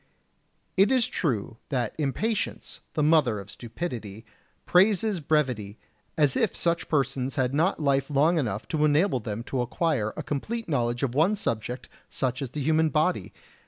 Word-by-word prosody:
It 195 +5 +5
is 255 -3 +4
true 115 - -2
that 125 -5 -1
impatience, 210 - -2 0.2
the 150 - +1
mother 150 -9 +3
of 100 +1 -9
stupidity, 115 - -6 0.4
praises 200 +1 +3
brevity, 125 -9 0 0.4
as 145 -3 +3
if 225 - +1
such 170 0 -1
persons 135 -3 0
had 130 -1 0
not 160 +6 +2
life 140 -2 +1
long 155 +4 +3
enough 110 -6 -3
to 155 -2 0
enable 150 0 +3
them 110 0 -5
to 130 +1 -2
acquire 120 -3 0
a - - -3
complete 225 - -3
knowledge 120 -4 0
of 125 -3 0
one 165 +10 +3
subject 120 - -3 0.2
such 125 +1 -2
as 135 - -3
the 150 - -5
human 160 +2 +3
body! 155 - 0
140 Hz, 160 wpm, -26 LUFS, 120-165 Hz, 0.4 s, It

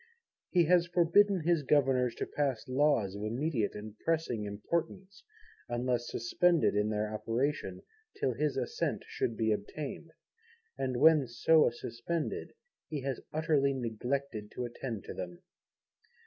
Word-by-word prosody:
He 175 -2 +4
has 175 +1 +4
forbidden 180 +3 +4
his 165 0 +2
Governors 130 -4 +2
to - - -3
pass 135 -6 -2
Laws 130 -7 +2
of 100 - -6
immediate 115 +1 -1
and 105 0 -8
pressing 155 -10 -1
importance, 170 - -4 0.5
unless 120 0 -1
suspended 170 +9 +2
in 105 +1 +1
their 105 0 -1
operation 115 +7 -2 0.4
till 430 - +1
his - - -1
Assent 470 +1 -2
should 435 -3 -2
be 110 -1 +2
obtained; 140 +10 -4 0.7
and 130 -2 -2
when 155 -1 +6
so 150 +7 +4
suspended, 120 - -4 0.3
he 150 -3 -3
has 135 -2 -3
utterly 150 -3 +2
neglected 120 -1 -3
to 125 - -3
attend 120 -3 -5
to - - -7
them. 90 -2 -7
135 Hz, 135 wpm, -32 LUFS, 115-160 Hz, 0.7 s, when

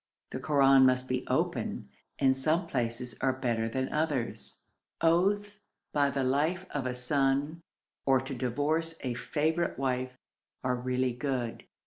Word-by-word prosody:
The - - -4
Koran 135 -1 +5
must 130 0 +1
be 130 0 -2
opened, - - -1 0.3
and 130 -1 +3
some 155 +7 +1
places 125 -4 -2
are 130 0 +2
better 115 -3 -1
than 130 +3 -2
others. 150 -6 -2 0.4
Oaths 200 +5 +2 0.3
by 145 -1 +3
the 140 -1 -1
life 155 +8 +1
of 140 -3 -2
a 125 - -2
son, 140 +4 0 0.4
or 135 -1 +4
to 135 +2 -5
divorce 145 +6 -1
a 125 -2 -2
favourite 160 +7 -1
wife, 130 -1 -2 0.5
are 125 -1 +1
really 125 0 0
good. 125 -2 -3
135 Hz, 140 wpm, -30 LUFS, 125-155 Hz, 0.5 s, Koran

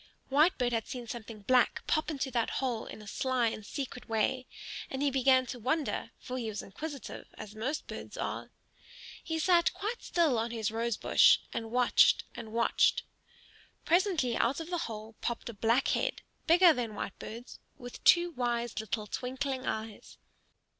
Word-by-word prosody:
Whitebird 280 -4 +3
had 225 -2 -1
seen 245 -2 -6
something 225 -2 -7
black 250 +4 +2
pop 310 +1 +1
into 275 -3 -2
that 235 -2 +1
hole 245 -4 -2
in 215 - -9
a - - -13
sly 255 +1 +1
and 215 - -7
secret 250 +1 -6
way, 225 +4 0 0.4
and 265 +1 -3
he 285 - +2
began 260 -1 +4
to 250 0 -6
wonder; 275 +6 -1
for 255 0 -5
he 225 -2 -3
was 210 - -5
inquisitive, 285 +8 -7
as 215 -1 -8
most 255 +8 -3
birds - - -8
are. - - -4 0.7
He 320 -1 -2
sat 340 +1 +4
quite 445 +4 -3
still 315 -9 +2
on 230 +1 -1
his 225 -3 -2
rose 230 0 -1
bush - - +6 0.2
and 225 -1 -3
watched 245 +1 +4
and 230 -3 -8
watched. 230 +1 +3 0.8
Presently 340 - +2
out 255 +6 +1
of 325 +2 -7
the 350 - 0
hole 220 0 -7
popped 235 0 -3
a - - -6
black 230 +5 +2
head, - - 0 0.2
bigger 345 0 +7
than 235 -5 -3
Whitebird's, 225 +5 -7 0.2
with 245 -1 -10
two 345 0 +6
wise 240 -4 -1
little 215 0 -3
twinkling 260 +4 -3
eyes. 220 -1 -5
245 Hz, 165 wpm, -31 LUFS, 225-285 Hz, 0.8 s, bigger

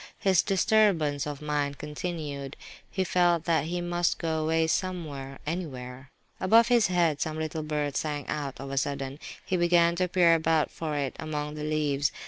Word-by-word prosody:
His 190 -4 +3
disturbance 185 -8 +2
of 145 0 -6
mind 145 -1 -1
continued; 150 -2 -5 0.3
he 190 - -1
felt 175 -2 +2
that 160 -3 +2
he 175 +2 -2
must 175 0 0
go 160 -1 -1
away 160 +1 +2
somewhere, 155 -6 -3
anywhere. 135 -5 -5 0.3
Above 225 +5 +5
his 235 -3 +4
head 170 -5 +1
some 155 0 -2
little 160 0 -3
bird 150 -2 -2
sang 145 -3 -2
out, 145 -3 -4
of 135 0 -6
a 135 - +1
sudden; 140 +1 -3 0.3
he 185 - 0
began 170 -1 +4
to 180 0 +1
peer 175 -2 +4
about 160 -1 +2
for 155 -2 -3
it 140 -3 -2
among 150 -1 -3
the 150 0 -6
leaves. 145 -2 0
155 Hz, 170 wpm, -28 LUFS, 145-175 Hz, 0.3 s, Above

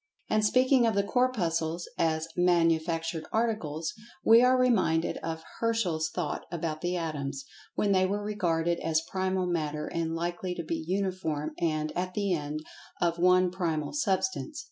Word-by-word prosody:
And 215 0 +3
speaking 255 +2 +4
of 220 - +1
the 200 - +3
Corpuscles, 175 -9 0
as 160 -1 0
"manufactured 165 -2 +1
articles," 210 -9 -1 0.3
we 230 +1 +8
are 255 +1 +5
reminded 190 -10 +2
of 160 0 -5 0.2
Herschel's 185 -9 0
thought 165 -2 -3
about 160 -2 -3
the 180 +1 -1
Atoms, 140 -4 -4 0.3
when 205 - +1
they 185 -1 +4
were 205 +2 -2
regarded 175 -5 0
as 160 0 0
Primal 190 0 0
Matter 155 -4 -2
and 165 -1 -2
likely 175 +2 -3
to 170 - -4
be 160 0 -3
uniform, 180 -5 -1
and, 155 -2 0
at 180 +1 -3
the 200 -3 +1
end, 150 -1 -3 0.4
of 170 -1 +1
one 180 0 +4
primal 165 -5 -2
substance. 195 +3 -1
175 Hz, 150 wpm, -29 LUFS, 160-195 Hz, 0.4 s, we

